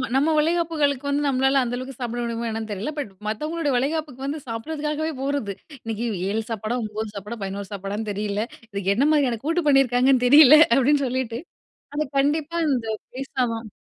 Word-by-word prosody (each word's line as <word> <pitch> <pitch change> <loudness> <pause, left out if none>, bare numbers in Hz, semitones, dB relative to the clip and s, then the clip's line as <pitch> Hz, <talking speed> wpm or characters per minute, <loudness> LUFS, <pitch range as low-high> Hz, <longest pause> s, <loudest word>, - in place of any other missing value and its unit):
நம்ம 290 +4 +3
வளைகாப்புகளுக்கு 305 -4 +1
வந்து 290 +1 +1
நம்மளால 270 0 +3
அந்த 245 0 -2
அளவுக்கு 255 0 -7
சாப்பிட 240 0 -3
முடியுமா 235 0 -3
என்னன்னு 220 -1 -4
தெரியல, 205 +9 -3
பட் 275 -9 -4 0.2
மத்தவங்களோட 305 +8 -2
வளைகாப்புக்கு 275 0 -2
வந்து 290 +3 -3
சாப்பிடறதுக்காகவே 300 +6 -3
போறது. 275 -8 -1 0.3
இன்னிக்கு 225 +1 -3 0.2
7 220 +2 0
சாப்பாட 220 +1 -2
9 215 0 -5
சாப்பாட 210 +4 -6
11 195 0 -5
சாப்பாடன்னு 200 +2 -4
தெரியல, 205 +1 -2 0.3
இதுக்கு 200 0 0
என்ன 275 +6 +3
மாதிரியான 260 -7 +2
கூட்டு 330 +2 +1
பண்ணியிருக்காங்கன்னு 260 -2 +4
தெரியல, 290 +2 +9 0.2
அப்டின்னு 275 +2 +3
சொல்லிட்டு 245 -2 -2 0.6
அது 305 - +1 0.2
கண்டிப்பா 300 +3 0
இந்த 245 -5 0 0.3
பேஸ்லாவாம். 245 -4 -2
255 Hz, 155 wpm, -23 LUFS, 225-290 Hz, 0.6 s, தெரியல